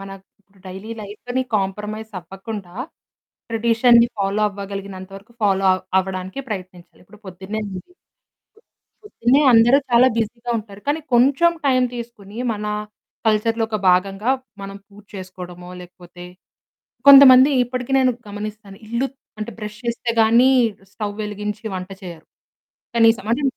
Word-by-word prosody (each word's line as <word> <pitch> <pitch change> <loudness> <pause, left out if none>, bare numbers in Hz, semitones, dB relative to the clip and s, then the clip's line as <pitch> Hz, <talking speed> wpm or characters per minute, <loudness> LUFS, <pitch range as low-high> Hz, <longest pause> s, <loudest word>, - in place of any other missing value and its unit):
మన 195 0 -9 0.3
ఇప్పుడు 195 0 -29
డైలీ 190 +5 -8
లైఫ్‌ని 245 +5 -4
కాంప్రమైజ్ 210 +3 -4
అవ్వకుండా 195 +1 -9 0.8
ట్రేడిషన్‌ని 235 +1 +4
ఫాలో 200 +2 0
అవ్వగలిగినంత 195 -1 -8
వరకు 205 +4 -16
ఫాలో 195 -1 +2
అవ్ 185 - -2 0.2
అవ్వడానికే 190 +5 -4
ప్రయత్నించాలి. 185 -3 -8
ఇప్పుడు 210 +3 -18
పొద్దున్నే 190 +4 -6
ఉంది. 185 - -6 1.2
పొద్దున్నే 275 - +2
అందరూ 235 +4 +6
చాలా 240 +2 +6
బిజీగా 235 +2 -3
ఉంటారు. 205 -2 -11
కానీ 300 +2 0
కొంచెం 275 +8 +4
టైం 255 -2 +3
తీసుకొని 230 -3 -9
మన 210 -1 -5 0.6
కల్చర్‌లో 225 +1 +1
ఒక 215 - -1
భాగంగా 195 +5 +1 0.3
మనం 195 0 -7
పూజ 205 0 -17
చేసుకోవడమో, 180 -2 -9
లేకపోతే 175 0 -14 0.8
కొంతమంది 275 0 +9
ఇప్పటికి 250 +2 -4
నేను 255 -1 +3 0.2
గమనిస్తాను. 210 -1 -8
ఇల్లు 235 +4 -1 0.3
అంటే 215 +2 -5
బ్రష్ 210 0 -7
చేస్తేగానీ 235 +1 +3 0.4
స్టవ్ 205 -1 -4
వెలిగించి 210 +1 -5
వంట 185 +1 -6
చేయరు. 170 -3 -10 0.7
కనీసం, 225 -2 +4
అంటే 280 +5 0
210 Hz, 120 wpm, -20 LUFS, 195-235 Hz, 1.2 s, కొంతమంది